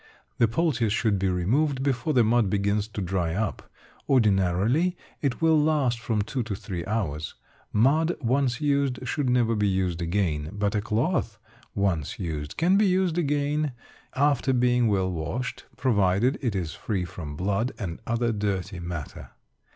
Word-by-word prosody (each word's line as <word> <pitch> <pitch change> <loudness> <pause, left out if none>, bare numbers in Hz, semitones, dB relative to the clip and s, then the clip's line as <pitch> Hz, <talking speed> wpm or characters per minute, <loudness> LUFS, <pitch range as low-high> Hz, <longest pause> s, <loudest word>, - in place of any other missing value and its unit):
The 115 - +5
poultice 120 -3 +1
should 105 -2 +1
be 95 0 +1
removed 130 - +1
before 135 +1 0
the 125 -3 +5
mud 115 -2 +3
begins 100 +1 0
to 105 -2 -5
dry 90 -2 -1
up; 105 0 -3 0.4
ordinarily 110 - +2 0.2
it 140 +2 -1
will 160 -2 +5
last 145 -6 +1
from 110 -2 -1
two 125 +4 -3
to 110 -3 -3
three 90 -3 -5
hours. 85 -9 -2 0.4
Mud 155 +10 +3
once 130 -1 +1
used 140 -4 0
should 140 0 0
never 120 -2 +2
be 105 -1 +1
used 95 -3 0
again, 85 -4 -1
but 105 0 -1
a 105 - +1
cloth 110 - -1 0.4
once 95 -7 0
used 75 -5 -5
can 180 +4 +3
be 210 0 +4
used 180 -2 +1
again, 145 -1 0 0.4
after 140 -1 +2
being 125 -1 +3
well 95 -3 +1
washed, 85 +10 -4
provided 105 +1 +2
it 120 -7 -1
is 85 -4 -2
free 95 -5 -2
from 75 -3 -7
blood 100 - 0
and 85 -6 -5
other 115 0 +1
dirty 100 -3 -2
matter. 85 -4 -6
110 Hz, 160 wpm, -26 LUFS, 95-135 Hz, 0.4 s, The